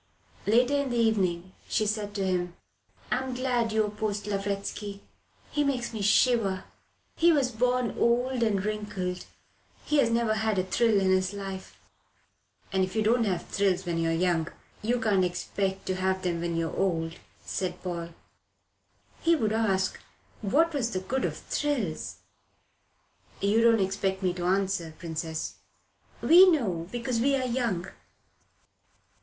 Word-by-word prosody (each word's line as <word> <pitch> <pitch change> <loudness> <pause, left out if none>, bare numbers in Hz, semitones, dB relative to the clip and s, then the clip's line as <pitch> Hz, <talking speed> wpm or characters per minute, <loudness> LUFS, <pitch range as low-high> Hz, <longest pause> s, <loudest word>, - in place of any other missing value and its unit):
Later 245 +6 +4
in 280 - -3
the 240 - -1
evening 185 -6 +1 0.2
she 215 - +1
said 205 -1 -2
to 195 -2 0
him: 180 -2 -1 0.6
"I'm 260 0 -1
glad 245 -3 0
you 220 0 +3
opposed 210 -1 -3
Lavretsky. 200 0 -3 0.5
He 295 - +1
makes 255 -4 -1
me 220 - -4
shiver. 205 -2 +3 0.5
He 340 +1 +5
was 275 -5 +2
born 250 +1 0
old 245 +2 +2
and 205 -4 +1
wrinkled. 200 -4 -3 0.6
He 300 - +2
has 230 - +4
never 230 -1 +2
had 220 -1 0
a 185 - +2
thrill 215 +3 +2
in 190 -1 +2
his 185 +1 +2
life." 195 -1 -7 0.9
"And 190 -1 +3
if 185 +2 -3
you 220 - +2
don't 230 +2 +3
have 185 -4 -1
thrills 190 -2 0
when 170 -1 -1
you're 165 0 +1
young, 165 -1 +1 0.3
you 240 +3 0
can't 205 -5 +2
expect 190 +2 -2
to 185 - -1
have 190 0 0
them 170 -2 -1
when 170 -1 -2
you're 165 -1 -2
old," 165 -4 -1 0.3
said 185 -1 -3
Paul. 170 -2 -4 1.1
"He 335 0 +4
would 220 -8 0
ask 195 -4 +1 0.4
what 310 +11 +2
was 255 -5 0
the 190 - -2
good 260 +8 -1
of - - -3
thrills." 255 - -2 1.2
"You 205 +3 +3
don't 230 -1 +5
expect 190 0 -1
me 180 -1 +2
to 175 -1 -4
answer, 185 -3 0
Princess." 160 -1 -4 0.7
"We 365 +3 +8
know 190 - 0
because 240 0 -2
we're 270 +1 +2
young." 235 -8 -1
205 Hz, 150 wpm, -28 LUFS, 185-235 Hz, 1.2 s, We